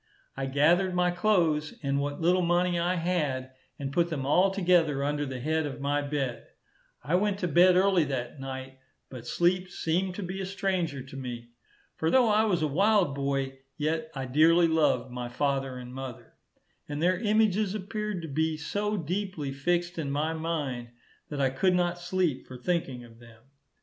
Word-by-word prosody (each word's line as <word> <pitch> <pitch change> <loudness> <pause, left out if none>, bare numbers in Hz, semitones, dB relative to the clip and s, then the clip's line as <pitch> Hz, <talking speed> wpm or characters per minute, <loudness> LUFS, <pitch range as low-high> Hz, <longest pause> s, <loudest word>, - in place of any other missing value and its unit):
I 135 0 -3
gathered 170 +7 +3
my 180 0 +2
clothes, 175 -6 +1
and 140 0 0
what 145 0 -3
little 180 +2 +3
money 175 0 +2
I 175 +2 +1
had, 150 -7 -1 0.3
and 140 -2 -5
put 170 +1 +2
them 145 -5 -3
all 180 +7 +4
together 175 -7 +2
under 145 0 -1
the 130 -1 -5
head 155 +3 0
of 140 - -7
my 145 +1 0
bed. 140 -4 -3 0.6
I 145 +6 -3
went 200 +2 +2
to 180 - +1
bed 180 +3 +5
early 190 -2 +4
that 130 -1 -4
night, 130 0 -7 0.3
but 120 -2 -9
sleep 180 +4 +1
seemed 180 +2 -1
to 205 - -4
be 185 +2 -4
a - - -3
stranger 185 -8 -2
to 135 +1 -12
me. 120 -3 -6 0.5
For 160 - +1
though 250 +1 +4
I 215 +1 +4
was 180 -7 +1
a - - +2
wild 195 0 +3
boy, 135 -1 -2 0.2
yet 155 +1 -1
I 135 -1 -3
dearly 165 +6 +5
loved 145 -6 +1
my 125 -1 -5
father 135 0 -1
and 125 0 -9
mother, 130 -2 -8 0.6
and 145 0 -3
their 180 +3 +2
images 215 -2 +2
appeared 210 -2 -4
to - - -5
be 160 +2 0
so 205 +6 -2
deeply 175 -3 -3
fixed 175 +4 -1
in 145 -3 -2
my 150 +3 0
mind, 150 -7 -3 0.4
that 145 - -4
I 135 -2 +2
could 180 +7 +2
not 175 -1 0
sleep 175 -5 -1
for 130 - -9
thinking 135 -4 -2
of 115 -1 -16
them. 115 -1 -17
160 Hz, 185 wpm, -28 LUFS, 135-180 Hz, 0.6 s, bed